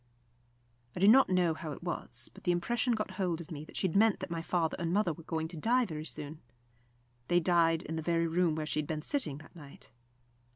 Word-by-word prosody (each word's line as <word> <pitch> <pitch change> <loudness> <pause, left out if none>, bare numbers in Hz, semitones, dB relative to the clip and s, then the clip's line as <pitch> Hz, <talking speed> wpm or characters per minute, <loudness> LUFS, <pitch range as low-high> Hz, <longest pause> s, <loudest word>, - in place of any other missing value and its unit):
I - - -4
do 195 - +5
not 260 +5 +7
know 180 -3 +3
how 155 -1 -6
it - - -11
was, 175 -1 -4
but - - -15
the 180 - +2
impression 235 +8 +1
got 215 -2 -2
hold 175 -3 0
of 170 +1 -9
me 150 -2 -6
that - - -10
she - - 0
had 165 - -5
meant 215 +1 +4
that - - -5
my 165 -1 -2
father 165 -1 0
and 170 -1 -1
mother 195 -3 +2
were 165 - -12
going 160 0 -2
to 170 - -8
die 245 +8 +2
very 155 -5 -6
soon. 155 0 -5 0.9
They 175 - +4
died 165 -1 +3
in 160 +2 -4
the - - -2
very 170 +1 +1
room 165 -1 +1
where 155 -1 -2
she 155 - -1
had 150 - -2
been 155 -2 -3
sitting 260 - -1
that 155 +4 -15
night. 145 -4 -13
170 Hz, 240 wpm, -32 LUFS, 160-185 Hz, 0.9 s, not